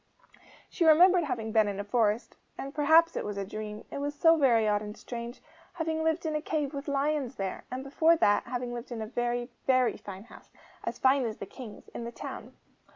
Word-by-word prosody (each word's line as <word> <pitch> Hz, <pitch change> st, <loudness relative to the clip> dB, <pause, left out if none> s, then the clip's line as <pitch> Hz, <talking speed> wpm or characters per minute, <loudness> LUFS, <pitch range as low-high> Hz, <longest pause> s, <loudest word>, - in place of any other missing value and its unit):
She -, -, -2 dB
remembered 345 Hz, +2 st, +6 dB
having 225 Hz, -6 st, -3 dB
been 215 Hz, -1 st, +4 dB
in 200 Hz, -1 st, -3 dB
a -, -, -2 dB
forest 215 Hz, 0 st, 0 dB, 0.2 s
and 275 Hz, +1 st, -6 dB
perhaps 320 Hz, +3 st, +5 dB
it -, -, -2 dB
was 205 Hz, -1 st, -5 dB
a 200 Hz, -, -2 dB
dream 210 Hz, +1 st, -7 dB
it -, -, -4 dB
was 290 Hz, +1 st, -3 dB
so 325 Hz, +3 st, +5 dB
very 240 Hz, -8 st, +3 dB
odd 205 Hz, -1 st, +2 dB
and 210 Hz, +1 st, -7 dB
strange 235 Hz, 0 st, -7 dB, 0.3 s
having 320 Hz, -2 st, -2 dB
lived 320 Hz, +1 st, 0 dB
in 315 Hz, -, -1 dB
a 305 Hz, -, 0 dB
cave 300 Hz, -2 st, -2 dB
with 280 Hz, +1 st, -6 dB
lions 280 Hz, -2 st, 0 dB
there; 195 Hz, -5 st, -4 dB
and, 255 Hz, +1 st, -5 dB
before 320 Hz, +4 st, +3 dB
that, 205 Hz, -10 st, +3 dB
having 245 Hz, 0 st, -4 dB
lived 240 Hz, +1 st, -7 dB
in 225 Hz, -2 st, -4 dB
a -, -, -4 dB
very, 240 Hz, +2 st, -2 dB, 0.2 s
very 255 Hz, -2 st, +3 dB
fine 195 Hz, -1 st, -9 dB
house, 235 Hz, -, -16 dB, 0.3 s
as -, -, -4 dB
fine 265 Hz, +1 st, +3 dB
as 220 Hz, -2 st, -4 dB
the -, -, -6 dB
King's, 215 Hz, +1 st, -11 dB
in -, -, -7 dB
the 235 Hz, -, -5 dB
town. -, -, -8 dB
250 Hz, 220 wpm, -29 LUFS, 220-300 Hz, 0.3 s, remembered